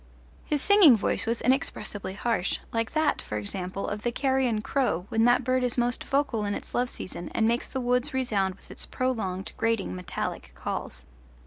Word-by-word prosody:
His 295 -2 +4
singing 390 - +8
voice 210 - -1
was 230 +1 0
inexpressibly 220 -6 -1
harsh, 220 -4 0 0.2
like 230 0 -1
that, 310 0 +1
for 105 - -5
example, 180 - -4
of 205 0 -4
the 240 - -1
carrion 260 -4 +1
crow 235 -12 0
when 225 0 +2
that 245 +1 +4
bird 255 +1 +1
is 245 0 0
most 240 0 +2
vocal 270 -6 0
in 205 0 -1
its - - -8
love 245 0 +1
season 180 -6 -6
and 220 - +3
makes 235 +1 0
the 265 - -4
woods 250 +3 +1
resound 205 -8 0
with - - -18
its - - -6
prolonged 205 -8 -2
grating 225 -3 0
metallic 180 -1 -5
calls. - - -5
235 Hz, 185 wpm, -27 LUFS, 205-255 Hz, 0.2 s, singing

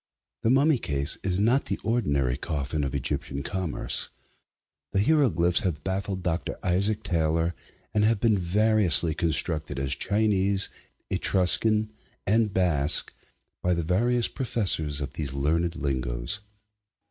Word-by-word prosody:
The 115 - +1
mummy 140 +2 +3
case 70 -3 -1
is 90 -1 -1
not 120 +7 +2
the 100 - -2
ordinary 70 - 0
coffin 75 0 -3
of 70 0 -3
Egyptian 70 +1 -2
commerce. 95 -3 +1 0.8
The 100 - +2
hieroglyphics 110 - +3
have 85 -7 -3
baffled 95 0 -3
Dr. 85 -1 -2
Isaac 100 +4 0
Taylor, 80 0 0 0.4
and 105 - +2
have 110 0 +2
been 110 0 +3
variously 95 -4 +2
construed 80 -2 -1
as 70 0 +1
Chinese, 100 +1 +1 0.4
Etruscan, 105 +3 +3 0.3
and 110 +1 +2
Basque, 85 -6 +2 0.5
by 90 0 +1
the 85 - -2
various 115 +8 +1
professors 85 - +1
of 70 0 -5
these 70 -3 -4
learned 80 +5 0
lingoes. 60 +1 -2
90 Hz, 125 wpm, -26 LUFS, 75-105 Hz, 0.8 s, mummy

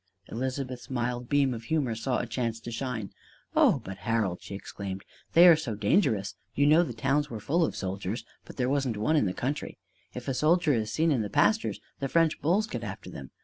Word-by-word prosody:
Elizabeth's 130 +1 -4
mild 120 -1 -2
beam 140 -3 +3
of 115 -1 -7
humor 140 -4 0
saw 120 +3 -1
a - - -2
chance 115 -1 -2
to 120 - -8
shine: 115 -4 -4 0.4
"Oh, - - +4
but, 95 0 -7
Harold," 105 -3 -1
she 100 - -7
exclaimed, 95 -1 -6 0.3
"they 175 +2 +9
are 170 - +9
so 140 -9 -4
dangerous! 105 - +1 0.2
You 140 - +3
know 155 +3 +6
the 165 - -2
towns 135 +6 0
were 115 - -5
full 165 - +1
of - - -1
soldiers, 95 +3 -4 0.2
and - - -11
there 125 -2 +1
wasn't 135 -5 0
one 150 +10 +1
in 130 -10 +3
the - - 0
country. 135 +8 -3 0.4
If 125 +1 -7
a 135 - 0
soldier 155 +4 +3
is 110 -3 -1
seen 160 +6 +2
in 130 -6 +2
the 105 - -3
pastures, 215 - +2 0.2
the 135 - -2
French 165 0 +2
bulls 185 +8 +2
get - - -5
after - - -7
them! - - -9
125 Hz, 215 wpm, -28 LUFS, 110-150 Hz, 0.4 s, they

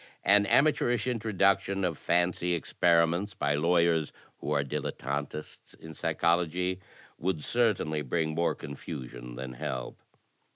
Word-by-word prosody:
An 100 0 +5
amateurish 120 -3 +3
introduction 100 -4 +1
of 85 -3 -1
fancy 90 +2 +1
experiments 85 +3 +2
by 70 +1 0
lawyers 85 0 +2 0.3
who - - -5
are 70 -2 +2
dilettantists 70 +2 -5
in 80 0 -10
psychology 90 +3 0 0.4
would 85 -4 -1
certainly 105 -11 +1
bring 80 +3 -1
more 85 +2 +1
confusion - - -8
than 65 0 -6
help. 60 0 -5
85 Hz, 115 wpm, -29 LUFS, 75-95 Hz, 0.4 s, An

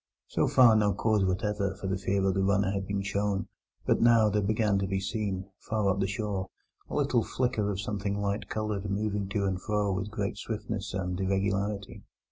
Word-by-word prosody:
So - - +1
far 120 -4 +6
no 105 -2 +3
cause 110 -1 +2
whatever 100 +1 0
for 95 - -8
the 95 0 0
fear 95 +1 0
of 95 - +3
the 95 - +1
runner 100 0 +2
had 100 -1 -3
been 100 -1 -1
shown; 100 -1 -1 0.4
but - - +2
now 115 -2 +6
there 105 0 +1
began 105 0 +2
to 95 - -1
be 95 0 0
seen, 95 -1 -2
far 110 -2 -1
up 95 - -1
the 95 - +1
shore, 100 -2 -3 0.4
a - - -4
little - - +2
flicker 115 -5 0
of 100 -2 -2
something 100 0 -2
light 100 +1 -2
coloured 105 -2 -2
moving 100 -1 -1
to 100 0 0
and 95 -1 -1
fro 105 -1 0
with 95 +2 -2
great 100 -2 -3
swiftness 105 -2 -4
and 90 -1 -2
irregularity. 100 +1 -1
100 Hz, 200 wpm, -29 LUFS, 95-105 Hz, 0.4 s, far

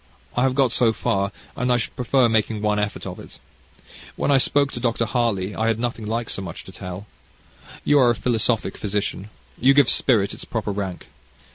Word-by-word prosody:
I 125 - +1
have 130 0 +2
got 135 -4 +3
so 120 -2 +3
far, 100 -2 -1 0.2
and 125 0 0
I 125 - +4
should 120 - -3
prefer 125 0 +3
making 110 -1 0
one 105 0 +1
effort 105 0 -3
of - - -6
it. - - -12 0.8
When - - 0
I 135 - +5
spoke 140 +1 +2
to - - -5
Dr. 115 -1 0
Harley, 110 -5 0
I 110 - 0
had 115 -1 +1
nothing 115 -2 -3
like 115 +1 -2
so - - -2
much 90 -3 -7
to - - -12
tell. 90 +2 -7 0.8
You 145 - +4
are 125 -2 +5
a 120 - +2
philosophic 115 -1 0
physician. 105 -1 -2 0.3
You 135 +3 +5
give 140 -3 +5
spirit 105 -7 +2
its - - -8
proper 110 -3 -3
rank. 95 -3 -4
115 Hz, 205 wpm, -23 LUFS, 105-125 Hz, 0.8 s, I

